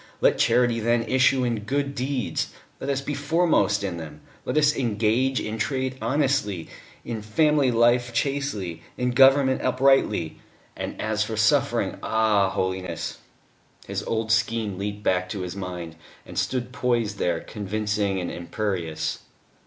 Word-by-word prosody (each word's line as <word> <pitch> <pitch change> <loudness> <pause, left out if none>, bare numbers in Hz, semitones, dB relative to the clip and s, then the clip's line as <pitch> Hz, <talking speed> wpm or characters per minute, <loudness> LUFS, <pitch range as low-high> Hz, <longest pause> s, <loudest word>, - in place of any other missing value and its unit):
Let - - +3
charity 120 0 +3
then 115 +1 +2
issue 130 +2 +3
in 120 -3 0
good 140 +6 -2
deeds. 130 -1 -2 0.3
Let - - -4
us 135 -1 0
be 145 +1 -4
foremost 145 - +2
in 95 -4 -3
them; 75 -2 -9 0.2
let - - -1
us 150 0 +4
engage 120 +2 +1
in 110 +1 -4
trade 130 +3 -1
honestly, 130 - 0 0.4
in 115 -2 -4
family 145 +5 +2
life 120 +1 +3
chastely, 115 - -2 0.2
in 125 0 0
government 135 +1 +5
uprightly. 130 -10 +2 0.4
And - - -5
as 110 0 0
for 110 0 -4
suffering 110 0 +2
ah! 110 -3 +2
Holiness!" 95 -1 -3 0.7
His - - -3
old 110 0 -1
scheme 110 -3 0
leaped 105 +1 -4
back 90 -1 +1
to 100 -1 -4
his 90 0 -5
mind, 90 -4 -6 0.3
and - - -11
stood 125 -1 -1
poised 120 -6 0
there 85 -2 +1
convincing 105 -1 -2
and 90 - -3
imperious. 85 -4 -3
110 Hz, 145 wpm, -25 LUFS, 100-130 Hz, 0.7 s, government